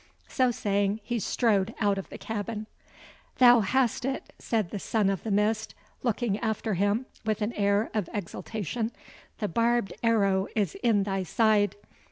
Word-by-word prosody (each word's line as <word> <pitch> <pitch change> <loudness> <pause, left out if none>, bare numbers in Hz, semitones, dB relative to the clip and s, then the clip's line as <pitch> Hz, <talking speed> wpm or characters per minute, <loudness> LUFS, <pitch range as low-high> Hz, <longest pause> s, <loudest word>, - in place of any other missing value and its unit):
So 255 -2 +2
saying, 205 -2 0
he 235 +2 -2
strode 205 -2 +1
out 205 -2 +2
of 195 - -8
the - - -8
cabin. 215 0 -4 0.7
"Thou 245 -2 +8
hast 245 +4 +1
it!" 270 +1 -3
said 220 -6 -1
the 205 - -3
Son 205 0 +1
of 195 - -3
the 225 - -5
Mist, 215 +2 +1 0.3
looking 230 -3 0
after 220 -1 -1
him 205 +6 +1 0.2
with 215 -1 -1
an 220 +3 -2
air 200 +1 +1
of 210 -5 -1
exultation; 220 +2 -4 0.5
"the 210 - -1
barbed 230 0 +1
arrow 200 -4 +2
is 205 -7 +1
in 220 -5 +3
thy 195 -1 -1
side! 210 +2 +2
215 Hz, 160 wpm, -28 LUFS, 200-230 Hz, 0.7 s, Thou